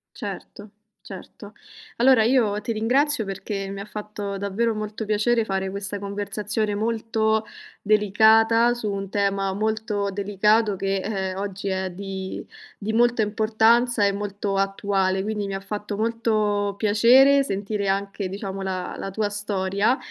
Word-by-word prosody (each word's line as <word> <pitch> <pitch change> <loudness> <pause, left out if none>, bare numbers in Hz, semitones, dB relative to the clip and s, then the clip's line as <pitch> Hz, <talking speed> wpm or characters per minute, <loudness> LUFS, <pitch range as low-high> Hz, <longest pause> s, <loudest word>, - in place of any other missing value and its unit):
Certo. 205 0 -8 0.4
Certo. 200 +1 -11 0.4
Allora 245 -2 +5
io 220 -4 +2
ti 230 - -3
ringrazio 250 +4 +1
perché 195 0 -4
mi 200 0 -6
ha - - -7
fatto 210 -2 -6
davvero 205 +4 -1
molto 215 +1 -5
piacere 220 +2 +1
fare 190 -2 -2
questa 200 +1 -4
conversazione 205 +1 -2
molto 220 0 0 0.4
delicata, 220 +3 +4
su 230 -3 -3
un 195 -1 -4
tema 195 -1 0
molto 210 0 -1
delicato 205 +1 +1
che, 195 0 -1
ehm, 190 -3 -3
oggi 200 0 -5
è 190 -1 -1
di 190 0 -6 0.3
di 220 +2 -4
molta 240 0 +3
importanza 220 +2 +3
e 200 - +2
molto 200 0 -3
attuale, 195 -1 0
quindi 210 -1 -2
mi 195 - -4
ha 195 - -3
fatto 205 +1 -5
molto 215 -3 0
piacere 245 +7 +5
sentire 200 -2 -2
anche 195 0 -2
diciamo 195 0 -5
la 185 -1 -4
la 195 - -5
tua 210 +1 -1
storia, 205 +3 0
205 Hz, 140 wpm, -24 LUFS, 195-220 Hz, 0.4 s, Allora